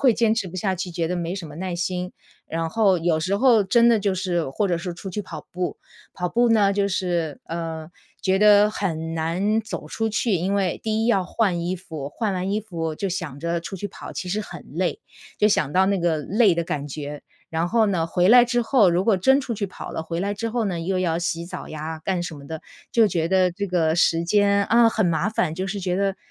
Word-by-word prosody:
会 255 -4 +5
坚 225 -1 +2
持 210 -5 -2
不 180 - -8
下 190 +1 0
去， 185 0 -4
觉 170 -1 -2
得 180 - -2
没 170 0 -3
什 185 -4 -6
么 150 -1 -11
耐 185 +1 -3
心， 180 +1 -3 0.3
然 165 0 -3
后 200 -1 +3
有 165 -1 +1
时 185 +5 0
候 230 -2 +4
真 235 +5 +4
的 230 -2 +4
就 200 -2 0
是 175 -4 -1
或 200 +9 -1
者 175 -2 0
说 175 +1 -4
出 190 +3 -7
去 210 - -3
跑 160 -6 -8
步， 180 0 -3 0.3
跑 180 -1 -3
步 240 +5 +2
呢， 210 -3 +4
就 200 0 +1
是， 175 -5 -2
呃， 165 -1 -5 0.3
觉 190 0 +2
得 210 0 +6
很 165 -6 -3
难 180 +7 0
走 215 - -7
出 225 0 -1
去。 220 +2 -1
因 185 +3 0
为 190 -3 0
第 220 0 0
一 - - +1
要 195 -6 +3
换 185 -4 0
衣 175 +2 -1
服， 160 -6 -7
换 205 +8 -2
完 185 +1 -2
衣 215 - 0
服 165 -6 -4
就 195 +5 -3
想 170 -7 -5
着 170 +1 -1
出 180 +4 -7
去 205 +2 -5
跑， - - -10
其 185 - -5
实 205 +4 -1
很 - - -8
累， - - -1 0.4
就 210 - +4
想 150 -8 +1
到 190 +3 +4
那 200 0 +1
个 170 -2 +1
累 200 +5 +3
的 170 - 0
感 145 -3 -3
觉。 145 0 -6 0.3
然 165 +1 0
后 225 +2 +3
呢， 180 -5 0
回 175 +2 +2
来 245 +2 +8
之 240 0 0
后 225 -5 +4
如 175 +2 +1
果 210 -3 +3
真 265 +9 +4
出 250 -4 -4
去 200 -1 -2
跑 - - -8
了， 160 - -4
回 165 +1 -3
来 200 +2 -1
之 230 +3 -3
后 235 0 0
呢， 185 -4 -2
又 185 +3 -1
要 165 -2 0
洗 170 -1 -2
澡 180 +1 -7
呀， 155 +1 -6
干 185 -2 0
什 165 -3 -6
么 140 -1 -12
的， 160 +1 -6 0.3
就 225 -2 +5
觉 165 -3 0
得 185 0 +3
这 200 +4 -4
个 165 -3 +1
时 165 -1 +3
间， 200 +2 +3
啊， 235 0 +5
很 220 -2 0
麻 165 +2 +1
烦， 185 -7 0
就 185 +3 -3
是 200 +1 -4
觉 180 -1 -1
得 195 0 0
185 Hz, 265 characters per minute, -23 LUFS, 170-205 Hz, 0.4 s, 来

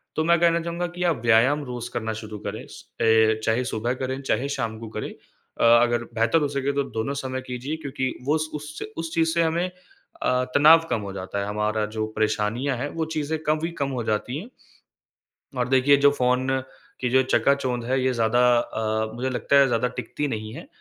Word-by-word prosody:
तो 155 - +1
मैं 170 0 +4
कहना 170 0 +4
चाहूँगा 170 +1 -3
कि 180 - -2
आप 170 -5 +2
व्यायाम 125 +6 +4
रोज़ 120 -1 -6
करना 110 -1 -2
शुरू 105 -1 -7
करें - - -5
स - - -12 0.2
अ, 110 -1 +4
चाहे 115 +3 +1
सुबह 120 0 -1
करें, 130 +1 -3
चाहे 135 0 0
शाम 115 -5 -3
को 115 - -7
करें। - - -3 0.5
अ, - - +1 0.2
अगर 120 -1 +1
बेहतर 115 +8 +3
हो 145 - +1
सके 140 0 -1
तो 140 0 +1
दोनों 115 +5 -1
समय 130 0 -3
कीजिए 125 +4 -4
क्योंकि 130 -1 -2
वो 150 +3 +2
स 155 0 -3
उससे 150 +1 -6
उस 165 0 -4
चीज़ 165 0 +2
से 170 0 +3
हमें 165 +2 +1 0.6
अ, 125 0 +2
तनाव 160 +3 +7
कम 115 -3 0
हो 100 -1 -6
जाता 95 +1 -4
है, 100 - -2
हमारा 105 +1 -1
जो 110 - 0
परेशानियाँ 110 +5 0
हैं, 145 +4 -3
वो 165 -1 -1
चीज़ें 155 +1 -1
कम 155 0 +1
ही 170 - -3
कम 140 - +1
हो - - -2
जाती 110 +5 -1
है। 200 - -9 1.1
और 125 -1 0
देखिए, 130 +2 +5
जो 140 0 +5
फ़ोन 125 -1 +1 0.5
की 125 - 0
जो 130 +1 +5
चकाचौंध 130 -2 +1
है 130 +2 0
ये 130 0 +2
ज़्यादा 115 0 +2 0.2
अ, 110 -1 -2
मुझे 130 +2 -2
लगता 130 +2 +1
है 140 - +6
ज़्यादा 120 -1 +1
टिकती 150 - -3
नहीं 110 -3 -4
है। - - -9
130 Hz, 210 wpm, -24 LUFS, 115-145 Hz, 1.1 s, तनाव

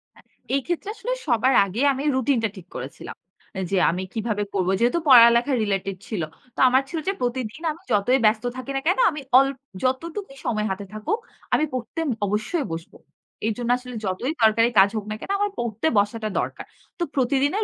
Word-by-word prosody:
হ্যাঁ, - - -21 0.3
এই 275 - +1
ক্ষেত্রে 350 +4 -2
আসলে - - -4 0.2
সবার 255 +1 +3
আগে 200 +5 -4
আমি 270 +2 -4
রুটিনটা 255 -4 +1
ঠিক 180 -1 -11
করেছিলাম। 130 +3 -7 0.6
যে 195 - +2
আমি 180 +2 -3
কিভাবে 215 -2 -1
করব। 185 -2 0
যেহেতু 245 +9 +2
পড়ালেখা 235 0 +7
related 195 -1 -2
ছিল। 210 -7 -3 0.3
তো - - -9
আমার 260 +2 +4
ছিল 325 - -3
যে 390 - +2
প্রতিদিন 245 +2 -3
আমি 315 - -11
যতই 230 +5 +3
ব্যস্ত 215 +1 +3
থাকি 255 +2 -5
না 270 - 0
কেনো 375 +8 +3
আমি 300 -2 -6 0.2
অল 270 +1 +6 0.4
যতটুকুই 275 +4 -2
সময় 215 -2 0
হাতে 195 +1 -4
থাকুক, 215 - -2 0.3
আমি 305 - +4
পড়তে 280 +6 -3 0.2
অবশ্যই 215 - -1
বসব। 165 0 -6 0.5
এর 225 - +1
জন্য 240 -1 -3
আসলে 250 -1 -9
যতই 195 +10 -2
দরকারি 225 +2 +5
কাজ 195 +1 +7
হোক 215 - -3
না - - -2
কেনো, 395 - -3
আমার 410 0 +1
পড়তে 235 +4 -1
বসাটা 215 +2 +1
দরকার। - - -4 0.3
তো - - +1
প্রতিদিনের 280 - +1
240 Hz, 185 wpm, -24 LUFS, 210-275 Hz, 0.6 s, পড়ালেখা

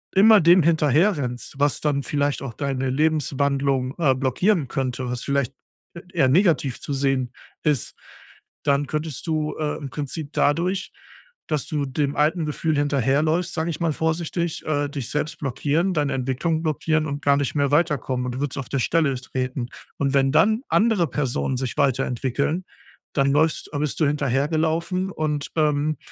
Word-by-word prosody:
immer 215 +2 +7
dem 175 +1 +6
hinterherrennst, 150 -4 +1
was 145 0 +1
dann 145 -2 +1
vielleicht 145 0 -1
auch 135 -4 -5
deine 135 +1 -2
Lebenswandlung, 140 -2 +1
äh, 140 -6 +3
blockieren 140 - +1
könnte, 130 -2 -2
was 125 0 -3
vielleicht 140 -2 0 0.4
e - - -7
eher 135 -7 +3
negativ 155 - +2
zu 145 - -4
sehen 135 -2 0 0.3
ist, 150 -6 0 0.7
dann 140 -1 +2
könntest 155 +1 -4
du, 155 -1 -1
äh, 150 -1 -1
im 145 -3 -7
Prinzip 145 +2 -5
dadurch, 180 +6 +1 0.6
dass 150 -4 -1
du 150 -2 -1
dem 140 +1 -1
alten 155 +2 +1
Gefühl 150 +1 -1
hinterherläufst, 145 +5 +1
sage 160 0 -1
ich 170 +1 -4
mal, 165 - +2
vorsichtig, 160 +2 -2
äh, 145 -2 0
dich 140 -5 -5
selbst 155 +2 -2
blockieren, 150 +7 0
deine 145 -3 0
Entwicklung 135 +6 -1
blockieren 155 0 0
und 145 -1 -4
gar 140 0 +4
nicht 140 +1 -2
mehr 140 -1 +1
weiterkommen 145 -5 +1
und 125 - -4
du - - -5
würdest 145 -1 -3
auf 135 - -5
der 140 - -1
Stelle 155 +2 +2
treten. 130 -1 -3 0.3
Und 140 -1 0
wenn 135 -1 +3
dann 215 - +3
andere 210 -6 +3
Personen 135 -1 -1
sich 130 -1 -3
weiterentwickeln, 135 +3 0 0.5
dann 140 -1 +2
läufst 155 +2 +1
äh, - - -1
bist 150 +1 -2
du 155 - +4
hinterhergelaufen 160 +6 0
und, 150 -3 -2
ähm, 150 -1 +1
145 Hz, 165 wpm, -23 LUFS, 135-160 Hz, 0.7 s, immer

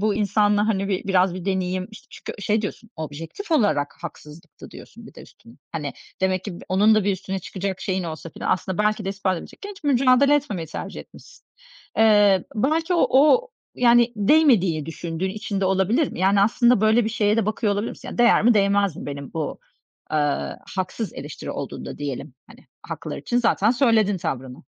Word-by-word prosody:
bu 210 0 +1
insanla, 205 0 +2
hani, 195 -2 0
bir 190 -2 -2
biraz 185 -1 +3
bir 185 -1 -7
deneyim, 185 -1 -1
işte, 215 - -14
çünkü 205 - -9
şey 215 +2 +1
diyorsun, 215 +2 -6
"Objektif 160 - -7
olarak 205 - +2
haksızlıktı." 160 0 -11
diyorsun, - - -13
bir - - -15
de - - -12
üstüne. - - -18 0.2
Hani, - - -4 0.3
demek 190 -1 0
ki 200 - -5
bu - - -10
onun 205 +4 +4
da 215 -2 +2
bir 200 - +2
üstüne 190 +1 -4
çıkacak 190 +1 -5
şeyin 190 -1 -2
olsa 160 0 -7
falan - - -4
aslında 185 0 -1
belki 210 0 +1
de - - -3
ispat 195 -2 -1
edecekken, 405 - -10
hiç 390 -5 -13
mücadele 275 +1 +4
etmemeyi 240 - -2
tercih - - -7
etmişsin. - - -16 0.5
Eee, 205 -4 +5
belki 315 - +1
o 340 - +4
o, 305 - +5 0.3
yani, 240 -1 +4
değmediğini 205 - +3
düşündüğün 170 +3 -4
için 205 -1 -4
de - - +1
olabilir 195 - +1
mi? - - -8
Yani, 195 +1 +3
aslında 235 +2 +3
böyle 220 +2 +4
bir - - 0
şeye 210 -1 +1
de 225 - +1
bakıyor 215 0 0
olabilir 205 +3 -2
misin? - - -9
Değer 240 -3 +5
mi 240 0 +5
değmez 200 -3 +2
mi - - -8
benim 140 -1 -7
bu, 160 -2 -4 0.5
eee, 145 -2 0 0.2
haksız 190 +3 -3
eleştiri 140 -1 -7
olduğunda - - -6
diyelim, 140 -1 -5
hani, 230 +2 -18 0.2
haklılar - - -6
için 240 - -1
zaten 225 -3 +2
söyledin 225 -5 +3
tavrını. 130 -6 -5
200 Hz, 185 wpm, -23 LUFS, 185-230 Hz, 0.5 s, Eee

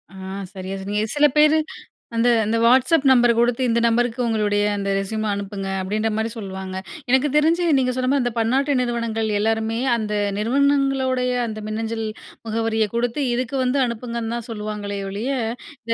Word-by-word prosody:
ஆ - - -11 0.4
சரியா 190 0 -5
சொன்னீங்க. 205 +2 -2
சில 295 0 +5
பேரு 305 +1 +6 0.6
அந்த 230 +1 +2 0.2
அந்த 220 +2 0
Whatsapp 260 +5 +4
நம்பர் 240 -2 +5
குடுத்து, 240 +1 +2
இந்த 235 0 +2
நம்பருக்கு 240 +1 +1
உங்களுடைய 210 -2 +1 0.2
அந்த 200 0 -2
ரெஸ்யூம் 215 +2 -3
அனுப்புங்க 200 -1 -5
அப்படின்ற 215 +4 -1
மாதிரி 220 +1 -1
சொல்லுவாங்க. 190 -2 -6 0.3
எனக்கு 265 +3 +4
தெரிஞ்சு 330 +3 +3
நீங்க 255 -1 +1
சொன்ன 255 0 0
மாரி 280 -3 +2
அந்த 245 - -2
பன்னாட்டு 265 +5 +1
நிறுவனங்கள் 230 -2 -1
எல்லாருமே 225 +1 0 0.2
அந்த 215 -2 -3 0.3
நிறுவனங்களோடைய 265 +1 +1
அந்த 215 -1 -6
மின்னஞ்சல் 225 +1 -3 0.4
முகவரிய 225 0 0
குடுத்து 245 +4 0
இதுக்கு 255 +2 -2
வந்து 255 +2 +1
அனுப்புங்கன்னு 235 0 -4
தான் 235 - -7
சொல்லுவாங்களே 210 -2 -4
ஒழிய 215 +8 -3 0.6
இந்த 230 - +2
230 Hz, 155 wpm, -22 LUFS, 215-255 Hz, 0.6 s, பேரு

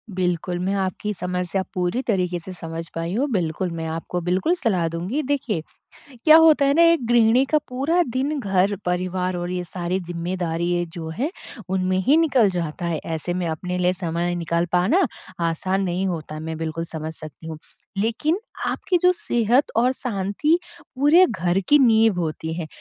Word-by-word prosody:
बिल्कुल, 180 -1 -1
मैं 190 +2 -1
आपकी 195 +2 -2
समस्या 180 0 -2
पूरी 180 +6 -1
तरीके 180 -7 -1
से 185 +3 -8
समझ 165 -1 -6
पाई 165 +2 -3
हूँ। 260 +7 +1
बिल्कुल, 175 -2 -1
मैं 165 -1 -4
आपको 165 +2 -4
बिल्कुल 185 - +1
सलाह 185 -8 +2
दूँगी। 180 - -2
देखिए, 255 - -1 0.6
क्या 310 0 +9
होता 315 -3 +6
है 280 +1 +3
ना 335 - +5
एक 320 -9 +1
गृहिणी 240 +2 +4
का 305 - +6
पूरा 280 +8 +1
दिन 280 +4 -1
घर-परिवार 185 -2 0
और 175 0 -3
ये 180 -1 -2
सारी 175 +1 -3
ज़िम्मेदारी 175 0 -2
जो 165 -3 -6
है 290 +6 0 0.4
उनमें 185 0 0
ही 285 - +6
निकल 270 -10 +4
जाता 175 -1 -3
है 165 -2 -1
ऐसे 165 +2 -3
में 180 -1 -2
अपने 180 +3 -3
लिए 180 0 +2
समय 175 -1 -2
निकाल 170 0 -1
पाना 220 - +3 0.4
आसान 190 +4 -1
नहीं 185 +2 -1
होता 155 -3 -4
मैं 160 0 -5
बिल्कुल 165 +1 -3
समझ 160 -1 -6
सकती 155 +1 -11
हूँ। 160 -1 -6 0.4
लेकिन 235 - 0 0.3
आपकी 360 - 0
जो 360 - +6
सेहत 240 - +1
और 245 +3 +3
शांति 240 - 0 0.4
पूरे 300 +7 +6
घर 180 -5 0
की 295 - +7
नींव 225 -6 +4
होती 160 0 -3
है। 165 -1 -4
185 Hz, 170 wpm, -23 LUFS, 170-240 Hz, 0.6 s, क्या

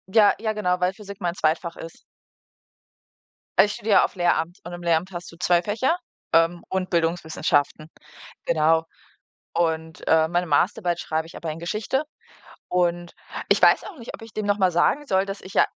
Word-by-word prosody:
Ja, 205 +1 +5
ja 220 0 -1
genau, 180 -4 0
weil 180 +1 +1
Physik 200 -1 -11
mein 175 0 -1
Zweitfach 165 +1 0
ist. 165 - -10 1.6
Also, - - +8
ich 205 - -4
studiere 210 -1 +1
ja - - +5
auf - - -8
Lehramt 175 -1 0
und 175 0 -8
im 175 - -7
Lehramt 170 +2 +1
hast 175 -1 -7
du 170 - -15
2 175 0 +3
Fächer, 235 - 0 0.4
ähm, 165 +1 +3
und 190 -1 -2
Bildungswissenschaften, 160 -3 0 0.6
genau. 160 0 +3 0.7
Und, 160 -1 -2
äh, 160 0 +4
meine 175 +2 0
Masterarbeit 175 +3 +1
schreibe 160 -1 -2
ich - - -13
aber 165 - -4
in 155 - -7
Geschichte 215 - -1 0.7
und 175 -1 0 0.4
ich - - +3
weiß - - +6
auch 400 - -9
nicht, 235 - -8
ob - - -9
ich 225 -1 -11
dem 215 -1 -3
noch 205 0 +1
mal 185 -2 +3
sagen 275 - +2
soll, 190 -5 +2
dass 195 +1 -6
ich 190 - -11
ja - - +6
175 Hz, 185 wpm, -24 LUFS, 165-200 Hz, 1.6 s, Also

